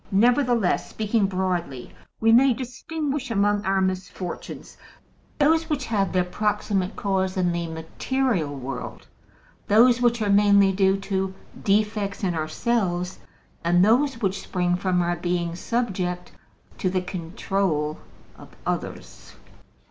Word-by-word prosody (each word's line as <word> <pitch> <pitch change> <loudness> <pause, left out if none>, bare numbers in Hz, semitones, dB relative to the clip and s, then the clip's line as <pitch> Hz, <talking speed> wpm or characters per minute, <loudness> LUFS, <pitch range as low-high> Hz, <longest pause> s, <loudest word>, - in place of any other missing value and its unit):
Nevertheless, 240 0 +2
speaking 215 -1 0
broadly, 180 -9 -2 0.3
we 225 0 +4
may 250 +2 +6
distinguish 275 +2 -4
among 205 -1 +1
our 190 0 +1
misfortunes 185 -1 -4 0.6
those 320 +2 +3
which 285 -4 -1
have 200 -4 0
their 185 -1 +2
proximate 195 0 -1
cause 190 -1 -1
in 180 -1 +2
the 170 0 -2
material 165 - -2
world, 135 0 -6 0.6
those 235 +3 +5
which 240 -1 +3
are 210 -2 0
mainly 200 -1 +5
due 190 0 +2
to 190 -1 -2 0.3
defects 210 0 0
in 180 -2 +1
ourselves, 180 +2 -1 0.4
and 175 +2 +4
those 255 +3 +3
which 195 0 0
spring 180 -1 0
from 180 -1 +1
our 175 0 0
being 175 -1 -2
subject 185 -5 -2 0.5
to 185 - +1
the 185 0 0
control 175 -3 -2 0.4
of - - -14
others. - - -5
195 Hz, 125 wpm, -24 LUFS, 180-225 Hz, 0.6 s, may